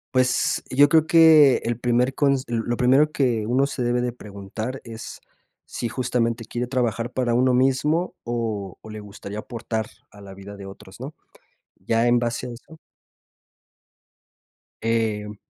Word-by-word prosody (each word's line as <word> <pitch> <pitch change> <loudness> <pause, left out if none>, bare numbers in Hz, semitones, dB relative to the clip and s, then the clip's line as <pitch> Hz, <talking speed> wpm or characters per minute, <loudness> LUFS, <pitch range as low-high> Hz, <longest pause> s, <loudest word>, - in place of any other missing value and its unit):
Pues, 130 -1 +1
yo 145 +3 +5
creo 160 +1 +4
que, 160 -5 +7
el 120 0 -1
primer 125 +2 +1
cons 140 -2 +1
lo 120 0 -2
primero 135 +5 +4
que 120 -7 0
uno 130 +5 +2
se 130 -3 -4
debe 120 0 +1
de 125 -1 -2
preguntar 110 +3 -7
es 115 -1 -9 0.5
si 120 - -4
justamente 115 -2 -1
quiere 120 +2 -4
trabajar 120 -2 -1
para 125 -2 0
uno 125 +1 +3
mismo, 135 +8 +1
o 110 -5 -4
o, 110 - -12
le 110 0 -7
gustaría 105 0 -8
aportar 110 -1 -4 0.2
a 100 - -15
la 95 -1 -11
vida 100 +1 -10
de 100 -1 -10
otros, 95 +2 -13
¿no? 140 +4 -6 0.6
Ya 115 +1 0
en 120 0 +3
base 120 +1 -2
a - - -6
eso 145 +7 -14 2.0
Em 110 -2 -1
120 Hz, 155 wpm, -23 LUFS, 110-130 Hz, 2.0 s, que